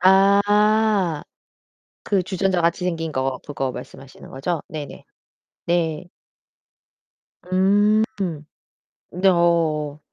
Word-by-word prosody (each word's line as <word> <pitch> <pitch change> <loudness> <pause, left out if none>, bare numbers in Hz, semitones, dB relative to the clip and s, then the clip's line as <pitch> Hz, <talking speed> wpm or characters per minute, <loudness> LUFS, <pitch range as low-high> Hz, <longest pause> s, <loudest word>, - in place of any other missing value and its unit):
아. 200 -2 +3 0.8
그 195 -3 0
주전자같이 180 -2 0
생긴 165 -3 -2
거 130 -2 -2
그거 135 -3 -3
말씀하시는 135 +2 -11
거죠? 150 +4 -3
네네. 150 -3 -8 0.6
네. 170 -1 0 1.4
음. 205 +4 +3 1.1
네어. 170 -5 +1
175 Hz, 150 characters per minute, -22 LUFS, 155-195 Hz, 1.4 s, 아